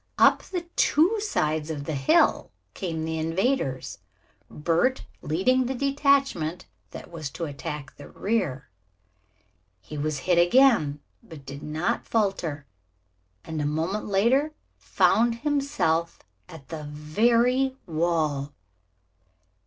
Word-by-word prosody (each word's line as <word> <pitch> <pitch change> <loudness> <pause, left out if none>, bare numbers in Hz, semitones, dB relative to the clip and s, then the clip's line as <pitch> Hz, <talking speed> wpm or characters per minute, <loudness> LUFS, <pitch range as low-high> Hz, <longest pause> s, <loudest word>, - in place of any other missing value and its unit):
Up - - +5
the 360 -2 -5
two 360 +9 +3
sides 155 - -1
of 150 -3 -4
the 155 - -4
hill 135 -2 +3 0.2
came 160 -3 -4
the 160 0 -3
invaders, 165 - -1 0.5
Bert 170 - 0 0.2
leading 245 +11 +1
the 265 - -2
detachment 275 - +1 0.2
that - - -10
was 155 -4 -5
to 170 +3 -5
attack 145 0 -6
the 145 - -11
rear. 190 - -2 1.1
He 150 +11 -8
was 150 -2 -2
hit 175 -2 +4
again, 175 - +4 0.2
but 160 -11 -13
did 140 +1 -8
not 155 +3 -2
falter, 180 -9 -1 0.8
and 160 -1 -4
a - - -1
moment 165 +8 -2
later 245 +10 +2 0.2
found 230 +1 +2
himself 275 - -1 0.3
at 160 -6 -12
the 155 -2 -6
very 235 - +1
wall. 155 -4 -1
170 Hz, 115 wpm, -26 LUFS, 150-245 Hz, 1.1 s, Up